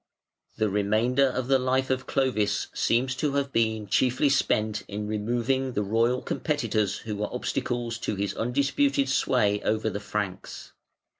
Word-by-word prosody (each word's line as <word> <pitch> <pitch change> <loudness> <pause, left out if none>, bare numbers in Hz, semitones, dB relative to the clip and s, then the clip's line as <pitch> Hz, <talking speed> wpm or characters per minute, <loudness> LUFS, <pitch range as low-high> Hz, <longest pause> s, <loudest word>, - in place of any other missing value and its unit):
] - - -40
The 110 -1 +2
remainder 110 +7 +2
of 130 -1 -2
the 135 -1 +4
life 130 +1 0
of 130 0 -1
Clovis 125 -6 0
seems 125 +3 +1
to 150 -2 0
have 140 -1 0
been 110 -2 0
chiefly 130 +7 +2
spent 110 -5 +1
in 105 +1 -4
removing 120 +5 -1
the 105 - 0
royal 115 +5 +1
competitors 110 - -1
who 110 -2 -5
were 105 - -3
obstacles 120 -2 -2
to 105 - -2
his 100 +1 -2
undisputed 140 +2 +1
sway 105 -6 +2
over 110 0 0
the 100 - -4
Franks. 105 -2 -5
120 Hz, 155 wpm, -26 LUFS, 105-130 Hz, -, the